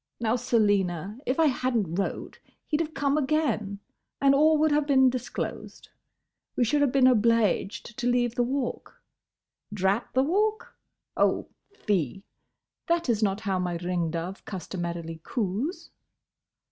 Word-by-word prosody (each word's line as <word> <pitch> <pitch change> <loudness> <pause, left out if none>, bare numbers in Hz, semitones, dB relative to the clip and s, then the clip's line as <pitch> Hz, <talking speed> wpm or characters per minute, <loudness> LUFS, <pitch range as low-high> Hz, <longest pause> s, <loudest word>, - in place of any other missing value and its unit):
—Now, 230 0 +1
Selina, 205 -4 +1
if 255 +5 0
I 325 - +5
had 255 -3 +1
n't 185 -4 -1
wrote 195 - -4 0.3
he 305 - -1
'd - - +1
have 315 -2 -4
come 280 +1 +1
again, 265 -9 -1 0.4
and 275 0 +5
all 310 +3 +5
would 310 0 +3
have 295 0 +2
been 265 -2 +5
disclosed. 250 -1 -5 0.7
We - - +2
should 290 +5 +2
have 285 -3 +3
been 270 -1 +4
obleeged 230 -1 +1
to 245 - -1
leave 245 -1 +1
the 245 - 0
Walk.—Drat 230 -5 -4
the 260 - +3
Walk?—Oh! 425 - -1 0.3
fie! 195 - -1 0.6
That 335 -4 +1
is 225 -2 +1
not 200 0 0
how 195 -4 -1
my 175 -1 -2
ring 175 -1 -1
dove 170 +4 -5
customarily 170 -3 -5
coos. 230 - -3
235 Hz, 140 wpm, -27 LUFS, 195-275 Hz, 0.7 s, I